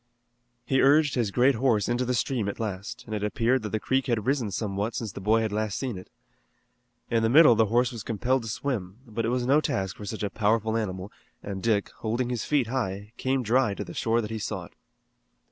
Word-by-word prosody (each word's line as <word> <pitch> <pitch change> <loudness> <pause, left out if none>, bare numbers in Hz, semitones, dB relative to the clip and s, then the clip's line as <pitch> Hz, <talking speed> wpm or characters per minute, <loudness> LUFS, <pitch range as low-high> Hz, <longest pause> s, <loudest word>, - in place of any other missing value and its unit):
He 135 -1 +2
urged 145 +2 +5
his 120 -5 0
great 125 +7 +4
horse 115 -4 +1
into 120 +1 0
the 125 0 0
stream 115 -4 0
at - - -6
last, 100 -2 -5
and 110 - -7
it 105 -1 -2
appeared 115 +4 +1
that 105 - -4
the 110 - -1
creek 130 +4 0
had 115 -4 0
risen 130 -5 +1
somewhat 100 +2 -2
since 110 -4 -3
the 100 - -8
boy 110 +3 +3
had 110 -2 -1
last 105 -1 -1
seen 130 -5 -3
it. 90 0 -10 1.0
In 115 -1 +3
the 115 - +2
middle 150 0 +8
the 110 -1 +3
horse 120 +4 +2
was 115 -3 -6
compelled 120 +5 0
to 115 - -6
swim, 105 -6 -3
but 115 -1 -3
it - - 0
was 125 0 0
no 140 +4 +4
task 95 -9 -2
for 105 - -8
such 105 +1 -5
a 100 - -1
powerful 110 +1 +1
animal, 95 -3 -3 0.3
and 100 -1 -5
Dick, 105 -2 +1
holding 120 +3 -1
his 120 -3 -2
feet 145 -4 +2
high, 105 -4 -3
came 130 0 0
dry 120 -2 +2
to - - -4
the - - -9
shore 115 +1 +1
that 105 0 -6
he 110 - -3
sought. 100 - -5
115 Hz, 230 wpm, -27 LUFS, 105-125 Hz, 1.0 s, middle